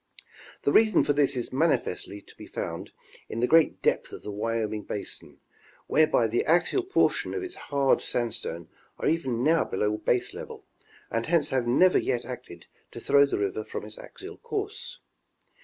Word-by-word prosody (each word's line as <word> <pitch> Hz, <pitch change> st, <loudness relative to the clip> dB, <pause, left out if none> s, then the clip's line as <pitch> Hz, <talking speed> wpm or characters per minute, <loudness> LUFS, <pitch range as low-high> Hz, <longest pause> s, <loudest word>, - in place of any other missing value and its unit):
The 140 Hz, -, +2 dB
reason 215 Hz, +6 st, +5 dB
for 145 Hz, -, +2 dB
this 145 Hz, -2 st, +2 dB
is 120 Hz, -, -4 dB
manifestly 130 Hz, -, 0 dB
to -, -, -18 dB
be -, -, -11 dB
found -, -, -5 dB, 0.4 s
in 115 Hz, -, -4 dB
the 120 Hz, -, +3 dB
great 160 Hz, +4 st, +3 dB
depth -, -, +1 dB
of -, -, -9 dB
the 105 Hz, -, -5 dB
Wyoming 110 Hz, 0 st, -2 dB
basin, 105 Hz, 0 st, -6 dB, 0.5 s
whereby 155 Hz, -6 st, +3 dB
the 115 Hz, +2 st, +1 dB
axial 175 Hz, -, +3 dB
portion 370 Hz, +1 st, +1 dB
of 395 Hz, -, -3 dB
its 360 Hz, -1 st, -6 dB, 0.2 s
hard 140 Hz, -2 st, +3 dB
sandstones 110 Hz, -8 st, -3 dB, 0.3 s
are -, -, -2 dB
even 130 Hz, -7 st, 0 dB
now 160 Hz, +3 st, +4 dB
below 105 Hz, 0 st, -1 dB
baselevel, 120 Hz, +3 st, -2 dB, 0.5 s
and 115 Hz, 0 st, -1 dB
hence 165 Hz, -3 st, +2 dB
have 125 Hz, -3 st, 0 dB
never 180 Hz, +10 st, +5 dB
yet 125 Hz, -2 st, -1 dB
acted 120 Hz, -9 st, -9 dB, 0.3 s
to -, -, -7 dB
throw 140 Hz, 0 st, +4 dB
the -, -, -1 dB
river 400 Hz, +2 st, -2 dB
from -, -, -6 dB
its -, -, -10 dB
axial -, -, -10 dB
course. 435 Hz, +1 st, -5 dB
135 Hz, 170 wpm, -27 LUFS, 115-170 Hz, 0.5 s, reason